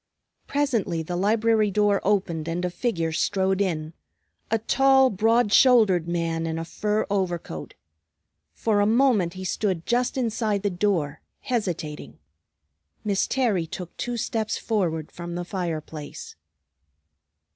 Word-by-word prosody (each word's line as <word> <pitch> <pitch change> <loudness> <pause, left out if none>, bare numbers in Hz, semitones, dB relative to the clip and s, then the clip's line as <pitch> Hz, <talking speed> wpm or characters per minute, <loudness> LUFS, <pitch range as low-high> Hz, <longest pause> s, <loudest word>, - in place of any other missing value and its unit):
Presently 235 - 0
the 175 +3 -4
library 215 +3 +2
door 205 0 +2
opened 185 -6 0
and 175 +2 -2
a 180 - -2
figure 175 -5 -1
strode 190 +3 +1
in; 160 -4 -2 0.6
a 225 - +2
tall, 265 +3 +4
broad 220 +2 +2
shouldered 215 -10 +5
man 165 -1 -1
in 160 0 -2
a 165 - -4
fur 210 +5 -1
overcoat. 175 - -3 0.8
For 215 -2 +1
a 205 - +3
moment 225 -7 +3
he 185 - -6
stood 185 -2 -1
just 245 +2 0
inside 220 -4 0
the 205 - +1
door, 175 -6 -1 0.2
hesitating. 180 -11 -3 0.9
Miss 200 -2 +1
Terry 215 -11 +1
took 175 +1 -7
two 245 -1 -3
steps 220 -1 -1
forward 170 -8 -1
from 175 0 -7
the 175 0 -3
fire 175 -4 -3
place. 150 -1 -9
195 Hz, 135 wpm, -25 LUFS, 170-220 Hz, 0.9 s, shouldered